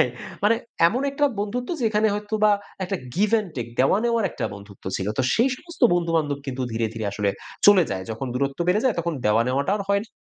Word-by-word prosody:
Right 125 - +2 0.3
মানে 225 +2 +5 0.3
এমন 250 +8 -2
একটা 290 +1 +1 0.2
বন্ধুত্ব 245 +5 -3
যেখানে 220 -1 +2
হয়তোবা 210 +1 +1 0.3
একটা 195 +1 -2 0.2
give 210 +3 +2
and 205 - -7
take 120 -1 -4
দেওয়া-নেওয়ার 225 - +2
একটা - - -4
বন্ধুত্ব 100 -1 -13
ছিল। 95 - -3
তো - - +3
সেই 235 +4 +3
সমস্ত 340 0 -14
বন্ধু-বান্ধব 165 -4 0
কিন্তু 130 -1 -3
ধীরে, 115 0 0
ধীরে 110 -2 -3
আসলে 100 -1 0 0.4
চলে 205 -3 +8
যায়। 95 -1 -3
যখন 115 +4 -4
দূরত্ব 140 +3 -1
বেড়ে 205 +4 +3
যায় 255 - +3
তখন 170 0 -2
দেওয়া-নেওয়াটা 125 - +2
আর 205 - -3
হয় 200 0 +3
না। 225 - -20
180 Hz, 200 wpm, -24 LUFS, -, 0.4 s, চলে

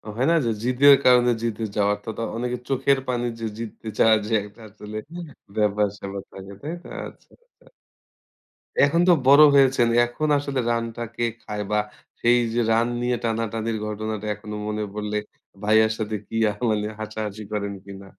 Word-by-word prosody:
হয় 125 - +1
না? - - +4
যে, - - +1
জিদের 135 +3 +6
কারণে 125 -1 +6
জিতে 115 -1 -2
যাওয়ার 105 0 +2
তো - - -7
তো - - -3
অনেকে 125 +1 -2
চোখের 135 +1 +2
পানি 120 -1 -1
যে 115 - -4
জিততে 115 -1 -8
চাওয়ার 110 -1 +5
যে 115 - -2
একটা 105 +3 -15
আসলে 105 +1 -9 0.6
ব্যাপার-স্যাপার 100 -1 -1
থাকে। 95 0 -10
তাই 155 +4 -5
তো? - - -12 0.2
আচ্ছা, - - -17
আচ্ছা। - - -31 1.1
এখন 145 +5 +4
তো - - +7
বড় 140 +3 +8
হয়েছেন। 130 -3 +4 0.2
এখন 135 +6 -3
আসলে 140 -2 -2
রানটা 115 0 -3
কে 120 - -2 0.2
খায়? 105 0 -5
বা 105 - +2 0.4
সেই 120 +1 +5 0.2
যে 120 - +1
রান 115 +1 +3
নিয়ে 125 0 +1
টানাটানির 115 0 -2
ঘটনাটা 110 0 -4
এখনো 105 +1 -8
মনে 105 0 -2
পড়লে। 105 0 -3 0.5
ভাইয়ার 110 +1 +4
সাথে 110 0 -2
কি - - -8
আ - - 0 0.2
মানে 105 -1 0
হাসাহাসি 110 -1 -5
করেন 100 -1 -2
কিনা? 100 0 -10
110 Hz, 170 wpm, -24 LUFS, 105-125 Hz, 1.1 s, বড়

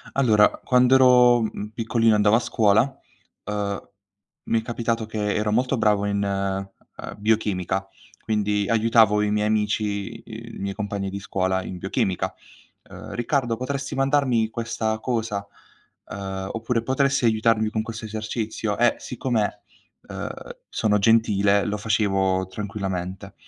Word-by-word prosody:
Allora, 110 -6 +5 0.2
quando 125 0 +4
ero, 125 -2 +6
mhmm, 105 -1 -4
piccolino 115 0 +2
e - - +4
andavo 105 +1 +4
a - - +4
scuola, 110 -2 +3 0.6
uhm, 100 -1 -2 0.6
mi 115 - +1
è - - -5
capitato 115 -1 -2
che 105 -2 -2
ero 105 0 0
molto 125 +4 +1
bravo 105 -2 +2
in, 100 0 0
ehm, 95 0 -4
biochimica, 100 -3 0 0.4
quindi 105 -2 0
aiutavo 110 -2 +4
i 105 - 0
miei 105 0 +1
amici, 105 0 -1
i 115 +1 -10
i - - -9
miei 100 0 -3
compagni 100 -2 -3
di 100 - -5
scuola 95 -1 -1
in 90 - -7
biochimica, 95 0 -1 0.6
uhm: - - -9
"Riccardo, 120 -1 0
potresti 135 +2 -4
mandarmi 135 -5 +2
questa 115 -1 -2
cosa?" 110 -5 -2 0.6
Ehm, 95 -1 -5
oppure: 115 +1 -2
"Potresti 135 +1 +1
aiutarmi 110 -1 +2
con 110 - -1
questo 110 0 -7
esercizio?" 110 0 -3
E 120 0 +3
siccome, 120 -4 -2 0.5
uhm, - - -5 0.4
sono 105 -2 +1
gentile, 100 -2 +3
lo 105 0 -2
facevo 95 -3 +1
tranquillamente, 95 -1 -5
110 Hz, 140 wpm, -24 LUFS, 100-115 Hz, 0.6 s, ero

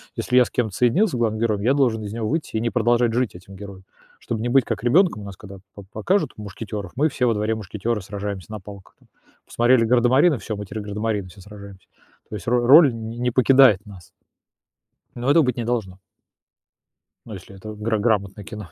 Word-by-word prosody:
Если 125 - 0
я 125 - +6
с - - -9
кем-то 110 -5 -2
соединюсь, 150 - +2
с - - -12
главным 115 -3 -1
героем, 110 -3 0
я 120 +6 +2
должен 120 -6 +1
из 105 0 -6
него 115 -1 -3
выйти 155 -4 -3
и - - -1
не 115 - 0
продолжать 120 0 +1
жить 125 -3 -1
этим 95 +2 -13
героем, 100 -1 -11 0.4
чтобы 110 -2 -5
не 120 - -2
быть 130 -1 +3
как 115 -1 -4
ребёнком. 160 - +3
У - - -9
нас, 100 -2 -10
когда 100 -1 -12 0.2
по 100 - -10
покажут 110 - -1
"Мушкетёров", 105 -2 -7
мы 150 +5 +2
все 130 -2 -1
во 115 - +2
дворе- 105 +1 -1
мушкетёры, 105 +2 -4
сражаемся 100 -2 -6
на 110 - -6
палках 100 0 -13
там. - - -27 0.4
Посмотрели 120 0 +2
"Гардамарины", 125 +6 +3
всё, 110 +1 -6
мы 105 0 -7
теперь 110 +2 -6
гардамарины, 105 -1 -3
все 95 +2 -15
сражаемся. 100 -1 -13 0.4
То - - -6
есть 95 - -9
ро 120 0 +1
роль 140 +1 +7
не 115 +2 -4
покидает 130 -5 +4
нас. 95 -6 -14 1.0
Но 125 +2 -2
этого 160 +1 +5
быть 125 -3 -1
не 120 - -3
должно. 110 -6 -3 1.3
Ну, 110 - -9
если 95 0 -11
это 110 +3 -9
гра 105 +1 -2
грамотное 105 -2 -1
кино. 100 +1 -9
110 Hz, 210 wpm, -22 LUFS, 100-120 Hz, 1.3 s, роль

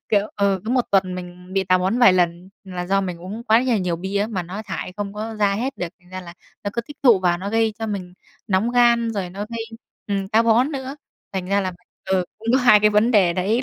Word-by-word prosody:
Kiểu 205 -1 +2
ừ, 200 -2 +1
cứ 220 - -3
1 250 -1 +2
tuần 190 -2 +2
mình 180 0 -9
bị 195 0 +1
táo 185 0 +3
bón 190 +6 0
vài 240 -7 +7
lần 175 0 0 0.2
là 180 -2 -5
do 195 +1 +2
mình 180 -3 -4
uống 205 +6 -7
quá 225 +1 +4
nhà 245 -5 +1
nhiều 180 -2 -1
bia 190 +4 -3
á, 205 - +1
mà 195 -5 -3
nó 190 +5 -7
thải 180 - -5
không 205 -1 -4
có 220 +2 -5
ra 205 -2 +2
hết 260 +6 -3
được, 175 - -3
thành 180 0 -23
ra 185 - -6
là 170 -1 -11 0.3
nó 205 - -1
cứ 235 - -1
tích 290 +5 -13
tụ 235 -7 +6
vào 175 -1 +1
nó 195 +3 -4
gây 225 0 +2
cho 225 - -3
mình 185 -4 -5 0.3
nóng 205 +3 +1
gan 235 -1 +4
rồi 190 -4 -3
nó 195 - -8
gây, 230 -1 -4 0.4
ừm, 195 -2 -2
táo 225 +2 +4
bón 240 +6 +3
nữa. 270 0 -5 0.4
Thành 190 -2 -3
ra 200 +2 +2
là 185 -1 -2 0.3
ừ, 190 -1 +1
cũng 225 +1 -8
có 260 - +5
2 245 -5 +6
cái 210 - +4
vấn 210 +3 +3
đề 195 -6 +4
đấy, 205 +8 0
200 Hz, 265 wpm, -22 LUFS, 185-225 Hz, 0.4 s, vài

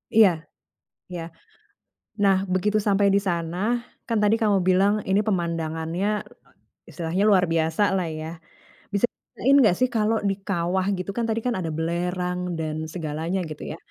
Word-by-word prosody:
Iya 220 -4 +8 0.8
iya. 175 -2 -5 1.0
Nah, 195 -1 +5 0.2
begitu 210 +3 +1
sampai 200 0 +4
di - - +5
sana 170 0 -2 0.5
kan 230 -2 0
tadi 210 +2 +4
kamu 205 -2 +3
bilang 195 +3 +4 0.2
ini 195 +2 +4
pemandangannya 165 0 -1 0.8
istilahnya 175 +3 -1
luar 185 -3 +5
biasalah 170 +3 +1
ya. 155 - -5 0.7
Bisa 200 +4 +3
diceritain 275 +3 0
enggak 215 -9 +5
sih 255 - +4
kalau 220 +1 +2
di - - +1
kawah 185 0 0
gitu 185 +2 -4
kan 235 - 0
tadi 225 +1 0
kan 245 - +1
ada 165 -2 -3
belerang 180 +2 -1 0.2
dan 155 -1 -2 0.2
segalanya 165 +2 -2
gitu 150 - -8
ya. - - -7
185 Hz, 145 wpm, -24 LUFS, 170-205 Hz, 1.0 s, Iya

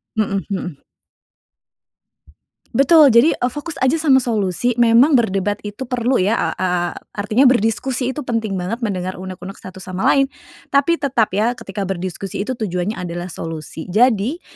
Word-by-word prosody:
Mhm 200 -3 0
mhm. 180 -6 -5 1.9
Betul, 285 -1 +6
jadi, 235 +8 +5
eee, 245 - -1
fokus 300 +2 -6
aja 260 +3 +2
sama 280 -4 +5
solusi, 230 -1 0
memang 235 +6 +5
berdebat 205 -4 +1
itu 210 +5 -6
perlu 250 +1 0
ya 195 +4 +2
a - - 0
a 185 - 0 0.4
artinya 215 +6 +1
berdiskusi 250 +2 +1
itu 295 - -5
penting 220 -5 -2
banget, 210 +7 -4
mendengar 185 -4 -3
unek-unek 185 +1 -8
satu 185 0 -10
sama 185 0 -6
lain, 275 -1 +3 0.5
tapi 285 +5 +3
tetap 250 -6 +1
ya 225 +4 +2
ketika 200 -5 -6
berdiskusi 185 +1 -4
itu 250 +4 -3
tujuannya 195 -1 -2
adalah 175 0 -5
solusi. 160 -1 -6
Jadi 240 - +2
220 Hz, 150 wpm, -19 LUFS, 190-255 Hz, 1.9 s, Betul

